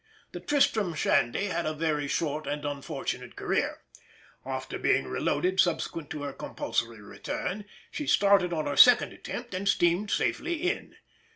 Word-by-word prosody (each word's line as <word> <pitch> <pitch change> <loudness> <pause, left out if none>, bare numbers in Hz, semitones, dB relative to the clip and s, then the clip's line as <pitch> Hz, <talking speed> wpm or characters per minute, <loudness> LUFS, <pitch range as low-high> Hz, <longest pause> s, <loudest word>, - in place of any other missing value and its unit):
The - - -6
Tristram 220 - +1
Shandy 150 +3 +1
had 170 -4 -2
a 155 - -2
very 150 -2 -1
short 155 0 -2
and 145 0 -3
unfortunate 145 -1 -4
career; - - -1 0.6
after - - -5
being - - +2
reloaded 180 +6 -1
subsequent 165 -3 0
to 150 -2 -5
her 140 -1 -4
compulsory 115 -4 -3
return, 195 - -5 0.3
she 295 - -5
started 200 -3 +4
on 155 -3 -1
her 145 -1 -2
second 245 -1 +7
attempt 240 -3 -7
and 195 +2 -1
steamed 175 +4 +2
safely 345 +10 0
in. - - -3
170 Hz, 150 wpm, -28 LUFS, 145-200 Hz, 0.6 s, second